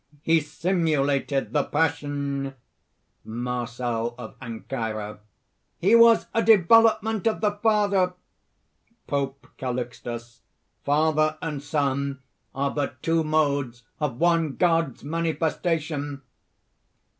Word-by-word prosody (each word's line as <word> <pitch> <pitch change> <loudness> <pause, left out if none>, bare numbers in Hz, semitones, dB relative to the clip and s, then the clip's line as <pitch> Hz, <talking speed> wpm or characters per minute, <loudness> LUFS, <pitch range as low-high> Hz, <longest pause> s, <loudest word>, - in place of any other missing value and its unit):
He 165 0 +4
simulated 150 -4 0
the 150 - +3
Passion!" 140 -3 -1 0.7
MARCEL 120 0 -3
OF 115 -3 -9
ANCYRA. 110 -3 -5 0.6
"He 195 +6 +2
was 230 -1 +7
a 230 - +2
development 220 +1 +4
of 225 - +1
the 210 -1 +2
Father!" 205 -4 +2 0.9
POPE 140 -1 -3
CALIXTUS. 120 -2 -5 0.4
"Father 155 +1 +2
and 150 -5 -4
Son 140 -2 -1 0.4
are 140 +1 0
but 145 -1 -4
two 165 0 +2
modes 140 -6 0 0.2
of 145 -6 -2
one 165 -4 +2
God's 165 -6 +1
manifestation!" 155 -2 -2
145 Hz, 95 wpm, -25 LUFS, 135-165 Hz, 0.9 s, was